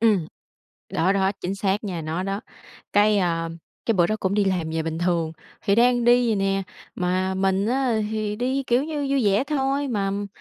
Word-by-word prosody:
ừm. 210 -8 +3 0.7
Đó, 185 +4 +2
đó, 195 -1 +2
chính 185 +2 -2
xác 195 +1 -1
nha, 180 -5 -3
nó 160 +3 -2
đó. 195 +1 -2 0.5
Cái, 210 0 +4
à, 165 -3 0 0.4
cái 230 - +3
bữa 175 -3 +4
đó 215 - -1
cũng 190 +1 0
đi 205 -1 +3
làm 180 -4 0
về 160 0 -1
bình 160 0 -3
thường, 170 -2 0 0.3
thì 200 - +2
đang 245 +1 +4
đi 240 +1 +5
vậy 225 -2 +1
nè, 195 0 +1 0.3
mà 185 +1 0
mình 190 +1 +1
á 245 -2 +1
thì 215 -1 -2
đi, 260 +4 0
kiểu 245 +3 +2
như, 300 -2 -3
vui 275 -3 +2
vẻ 205 +4 +3
thôi, 280 -1 0
mà, 205 -5 0
ừm, 200 +1 -2
200 Hz, 210 wpm, -24 LUFS, 185-240 Hz, 0.7 s, đi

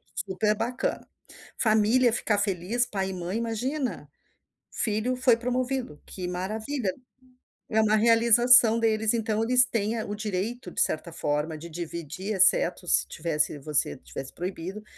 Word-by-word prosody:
Super 205 +2 0
bacana. 240 +3 -3 0.5
Família 225 +3 +3
ficar 220 -2 0
feliz, 205 +4 0
pai 195 -4 -3
e - - -5
mãe, 180 +3 -4
imagina. 245 +5 -3 0.6
Filho 220 +3 -1
foi 255 -2 +4
promovido, 250 - -3
que 180 -2 -6
maravilha, 210 +5 -3 0.8
é 220 - +2
uma 215 0 +3
realização 230 +1 +6
deles, 220 -1 +1
então 225 -1 -1
eles 250 +2 +5
têm, 225 -2 -2
eh, 220 - -2
o 205 - -5
direito, 210 0 -4
de - - -1
certa 165 +2 0
forma, 150 +1 -2
de 170 +3 -10
dividir, 170 +4 -5
exceto 180 -1 +3
se - - +3
tivesse 155 -2 -1
você 150 0 -1
tivesse 130 +1 -9
proibido 185 +3 -6
215 Hz, 140 wpm, -26 LUFS, 180-235 Hz, 0.8 s, realização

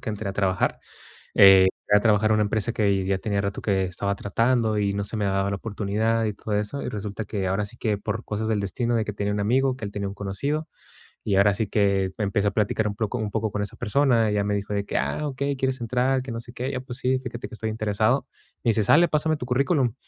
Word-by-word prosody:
que - - -6
entré 105 -1 -3
a - - -3
trabajar, 95 -2 0 0.5
eh, 95 -1 +8 0.3
entré 105 - +6
a - - +5
trabajar 110 -1 +3
a - - +5
una 105 0 +3
empresa 110 +2 -1
que 100 -4 +1
ya 95 0 0
tenía 100 +1 -1
rato 100 0 -3
que 95 -2 +1
estaba 100 +2 -2
tratando 115 +2 +1
y 100 -1 +1
no 100 - -2
se 100 +3 -5
me 105 - -1
daba 95 0 0
la 100 - -1
oportunidad 110 +2 -1
y 105 - -1
todo 105 +1 -4
eso. 105 +7 -2
Y - - -3
resulta 105 +1 -5
que 100 -2 -2
ahora 100 +3 0
sí 105 +4 -10
que 105 -3 0
por 110 +2 -4
cosas 110 +1 -3
del 110 -2 0
destino 120 +5 -1
de 110 -2 +1
que 105 - -4
tenía 100 0 -2
un 105 - -1
amigo, 130 +5 +2
que 110 - -7
él 100 - -4
tenía 100 -1 -4
un 100 - -5
conocido. 140 +11 -3 0.6
Y 100 - 0
ahora 100 +1 +5
sí 105 0 -1
que 100 -3 +1
empecé 100 -1 0
a - - -8
platicar 105 +1 0
un 100 - -5
poco 110 +3 -2
un 105 -2 -3
poco 110 -1 -1
con 105 - -2
esa 105 - -5
persona. 120 -1 +2
Ella 105 -1 +1
me 105 0 -1
dijo 100 +1 -3
de 100 0 -1
que: - - -2
"Ah, 150 - -1
okey, 140 +1 -2
quieres 130 0 -1
entrar, 125 +3 +1
que 130 - -7
no 115 - -4
sé 120 - -11
qué". 125 +1 -4
"Y 140 - -4
yo 130 - -3
pues 125 -2 -8
sí, 130 0 +1
fíjate 120 -2 -6
que - - -16
estoy 110 0 -3
interesado". 110 +3 0 0.4
Me - - +3
dice: 110 -1 +3
"Sale, 145 - +5
pásame 155 0 +1
tu 125 - -6
currículum". 130 0 +1
105 Hz, 265 wpm, -25 LUFS, 100-120 Hz, 0.6 s, eh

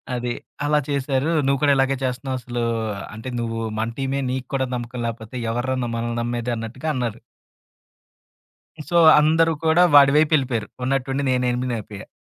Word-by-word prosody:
అది 120 0 -2 0.3
అలా 150 0 +3
చేశారు. 140 +1 0 0.2
"నువ్వు 140 -1 +2
కూడా 145 -1 +5
ఇలాగే 135 0 +2
చేస్తున్నావు. 130 +1 -3
అసలు 120 -1 -3 0.5
అంటే 110 +4 -7
నువ్వు 115 -1 -3 0.2
మన 110 +1 -1
టీమే. 135 +1 -1
నీకు 130 -1 -4
కూడా 130 - +1
నమ్మకం 120 0 -5
లాకపోతే 115 +1 -7 0.2
ఎవర్రా 120 +3 -1
న 120 - -2
మనల్ని 120 0 -3
నమ్మేది?" 120 0 -2
అన్నట్టుగా 120 +7 -5
అన్నారు. 120 -3 -3 1.7
సో 175 - +2 0.2
అందరూ 160 +2 +3
కూడా 160 +3 +5
వాడివైపెళ్ళిపోయారు. 140 -4 +4 0.2
ఉన్నట్టుండి 135 +1 -1
నేనెనిమీనయిపోయా. 125 -5 -2
130 Hz, 140 wpm, -22 LUFS, 120-140 Hz, 1.7 s, కూడా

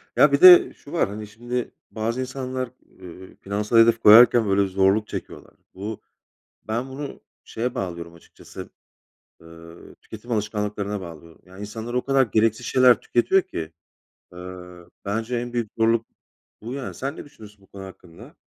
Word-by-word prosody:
Ya, - - +5
bir - - +1
de 365 0 +9
şu 145 - -16
var: 165 - 0
Hani, 105 +1 -8
şimdi, 120 +3 -5 0.2
bazı 115 +3 -3
insanlar, 130 -1 -5 0.3
eee, 95 0 -13
finansal 105 +3 -1
hedef 115 0 +5
koyarken 115 +1 +7
böyle 100 0 +2
zorluk 95 +3 +1
çekiyorlar. - - -9 0.2
Bu 105 +3 -7 0.7
ben 120 +4 -3
bunu 140 +2 -8 0.2
şeye 120 +2 -4
bağlıyorum 85 -3 -6
açıkçası, 85 - -13 0.7
ııı, 85 0 -15
tüketim 115 +3 -11
alışkanlıklarına 105 -1 -3
bağlıyorum. 85 -1 -12
Yani 95 +1 -15
insanlar 110 +3 -7
o 125 - -1
kadar 135 -1 +3
gereksiz 110 +2 0
şeyler 125 -1 +4
tüketiyor 185 +11 +2
ki, 80 - -7 0.6
ııı, 90 -1 -11
bence 110 +4 -3
en 120 0 -5
büyük 120 -3 -3
zorluk 115 0 +2 0.6
bu 115 +4 -7
yani. 140 -1 -6
Sen 140 +3 -5
ne - - -10
düşünüyorsun 105 -8 -16
bu 95 - -23
konu 100 0 -11
hakkında? 90 -3 -14
110 Hz, 150 wpm, -23 LUFS, 95-120 Hz, 0.7 s, de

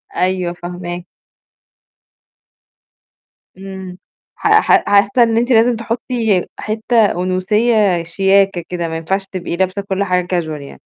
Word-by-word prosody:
أيوه، 180 -1 0
فاهما 175 0 -7 2.5
إمم، 190 -1 -9 0.4
ح - - -2
ح 380 - +3
حاسّة 200 +4 +4
إن 225 -1 +1
أنتِ 240 +2 +1
لازم 235 +1 +4
تحطّي 230 -4 -1
حتّة 220 +1 +1
أُنوثيّة 185 +1 +1
شياكة 195 +1 +2
كده، 175 -2 -3
ما 160 0 -4
ينفعش 190 +4 -2
تبقي 185 -3 -5
لابسة 190 +2 -1
كل 195 0 -2
حاجة 180 -2 0
casual 175 -3 -1
يعني. 140 - -11
190 Hz, 120 wpm, -17 LUFS, 180-220 Hz, 2.5 s, حاسّة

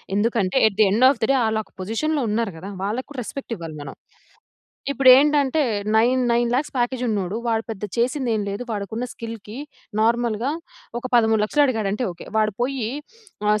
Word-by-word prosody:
ఎందుకంటే, 215 0 +1
at 200 - -3
the - - +8
end 230 +6 +4
of 270 -4 0
the 220 - +1
day - - +4
ఆళ్ళక 220 -1 -2
పొజిషన్‌లో 285 +10 -1
ఉన్నారు 220 0 0
గదా! 185 +5 -8
వాళ్ళకి 220 +6 -2
కూడా 275 - -6
రెస్పెక్ట్ 255 +2 -6
ఇవ్వాలి 165 -3 -8
మనం. 140 - -8 1.0
ఇప్పుడు 270 0 +3
ఏంటంటే, 290 +1 +3 0.3
నైన్ 250 +3 +3
నైన్ 240 0 +2
లాక్స్ 275 +4 -1
ప్యాకేజ్ 245 +1 0
ఉన్నోడు. 200 -1 -2
వాడు 225 -1 0
పెద్ద 210 -1 -7
చేసింది 250 +1 +1
ఏమి 205 - -2
లేదు. 200 +5 -4
వాడికున్న 215 +3 -3
స్కిల్‌కి 225 0 -8 0.4
నార్మల్‌గా 235 +2 +1 0.5
ఒక - - -23
13,00,000 220 +5 +3
అడిగాడంటే 220 -2 -1
ఓకె. 170 - -12
వాడు 215 -2 +1
పోయి 255 -3 -1 0.6
ఆహ్, 210 0 +3
225 Hz, 170 wpm, -22 LUFS, 210-255 Hz, 1.0 s, the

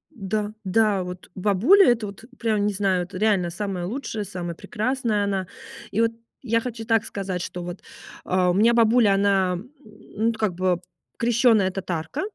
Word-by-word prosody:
Да, 210 0 -2
да 205 0 +2
вот 180 -1 -9
бабуля 215 - +4
это 230 -2 -1
вот 200 +2 -10
прям 215 -3 +1
не 210 - -1
знаю 190 -2 +1
это 185 +2 -8
реально 195 -4 +2
самая 180 0 -4
лучшая 225 -1 -4
самая 175 -3 -5
прекрасная 220 +3 -1
она. 195 -2 -1 0.4
И 220 - +1
вот 230 0 +3 0.3
я 230 -2 +2
хочу 225 -2 -6
так 225 -1 +2
сказать 190 -3 -4
что 180 0 -5
вот, 175 +1 -7 0.4
а, 180 -1 +2
у - - 0
меня 220 +5 +4
бабуля 230 -3 +4
она, 195 -2 +2
м, 195 +9 -7
ну 215 +1 -3
как 215 -4 -1
бы 180 0 0 0.4
крещёная 230 -4 +3
татарка 180 - -4
205 Hz, 170 wpm, -24 LUFS, 185-225 Hz, 0.4 s, бабуля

